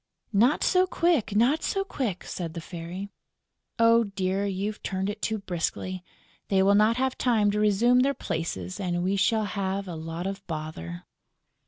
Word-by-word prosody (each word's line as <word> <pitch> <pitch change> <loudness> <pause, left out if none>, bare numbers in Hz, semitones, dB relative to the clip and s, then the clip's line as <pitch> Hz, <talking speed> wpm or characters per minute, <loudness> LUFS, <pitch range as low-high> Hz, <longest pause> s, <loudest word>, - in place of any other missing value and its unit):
"Not 240 +9 +4
so 370 0 +4
quick, 335 - +1
not 250 +9 +3
so 390 - 0
quick!" 245 - -3
said 170 -2 -5
the - - -3
Fairy. 175 +4 -7 0.7
"Oh 230 0 +5
dear, 195 0 -1
you've 200 +2 -3
turned 190 +1 -2
it 210 +1 -9
too 220 - 0
briskly: 185 -1 -3 0.4
they 190 -1 +3
will 200 +1 +5
not 215 +3 +4
have 260 0 -1
time 220 -5 +3
to 210 - -1
resume 215 +4 +4
their 275 +2 +2
places 125 - -4
and 175 -2 -1
we 190 +2 +1
shall 215 +3 +2
have 195 0 -2
a 175 - -5
lot 165 +2 -5
of 195 +1 -4
bother!" 155 - -6
200 Hz, 170 wpm, -27 LUFS, 180-230 Hz, 0.7 s, Oh